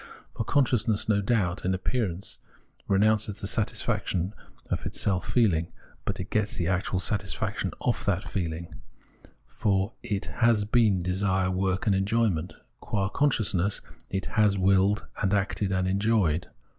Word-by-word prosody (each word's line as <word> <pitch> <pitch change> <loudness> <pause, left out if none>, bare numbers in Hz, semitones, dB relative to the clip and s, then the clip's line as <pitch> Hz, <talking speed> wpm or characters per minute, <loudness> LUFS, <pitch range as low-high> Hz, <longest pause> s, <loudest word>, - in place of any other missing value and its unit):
For - - -2
conscious 125 -4 +2
ness, 105 -2 +1
no 105 -2 +3
doubt, 100 -5 0
in 95 +1 +1
appearance 95 -2 -2 0.5
renounces 105 +1 +2
the - - -5
satisfac - - 0
tion 90 +3 -1 0.4
of - - -1
its - - -4
self 90 -4 0
feehng, 90 -9 +3 0.4
but 100 -1 -2
it 90 - -6
gets 105 -1 0
the 85 - -1
actual 95 +1 0
satisfac 100 +1 -1
tion - - -1
of - - 0
that - - +1
feeling; 85 -2 -4 0.6
for 100 +1 0
it 100 -1 -3 0.2
has 115 -3 +4
been 105 -5 +3
desire, 95 0 +1
work, 95 0 0
and 105 - +3
enjoyment; 95 -4 0 0.2
qua 100 -3 -1
consciousness 105 -8 +1 0.3
it 95 -1 -2
has 105 -2 +2
willed, 95 +2 +3
has 95 - 0
acted, 100 0 0
has 95 -1 0
enjoyed. 95 -4 +1
100 Hz, 150 wpm, -27 LUFS, 95-105 Hz, 0.6 s, has